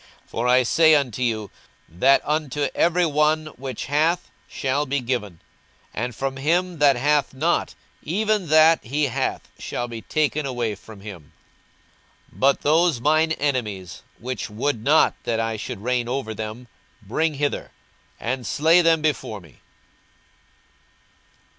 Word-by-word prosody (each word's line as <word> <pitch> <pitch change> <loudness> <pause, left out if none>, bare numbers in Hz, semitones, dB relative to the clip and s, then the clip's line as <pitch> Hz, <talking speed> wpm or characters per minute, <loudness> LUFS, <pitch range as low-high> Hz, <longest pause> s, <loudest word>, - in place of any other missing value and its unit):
42:019:026 - - -32
For 120 +2 -1
I 125 +1 +5
say 160 +5 +5
unto 130 -5 -1
you, 110 -4 -1 0.4
That 90 +12 +3
unto 150 -2 -1
every 175 +1 +2
one 155 0 +2
which 130 -2 -6
hath 160 +5 0 0.2
shall 140 +2 -1
be 140 +2 0
given; 115 -9 -3 0.5
and 120 +1 -3
from 135 0 -3
him 170 +4 0
that 145 -2 +5
hath 145 +2 +1
not, 160 +6 0 0.3
even 210 +3 0
that 155 +2 +5
he 145 +6 -1
hath 135 -5 -2
shall 120 - -4
be 115 -1 -7
taken 150 +1 0
away 120 -4 -2
from 100 0 -13
him. 95 -8 -11 1.0
42:019:027 - - -18
But 140 +1 +3
those 160 -2 +3
mine 155 +4 +2
enemies, 105 - -3 0.2
which 130 0 -5
would 110 +2 -2
not 150 +5 +4
that 115 -1 -1
I 115 0 -1
should 110 -1 -6
reign 125 -1 0
over 125 -4 -3
them, 110 +3 -7 0.4
bring 155 +10 -1
hither, 145 +1 -2 0.5
and 125 0 -3
slay 165 +4 +4
them 165 -2 +3
before 135 -8 -1
me. 80 -8 -19
135 Hz, 145 wpm, -23 LUFS, 115-155 Hz, 1.0 s, I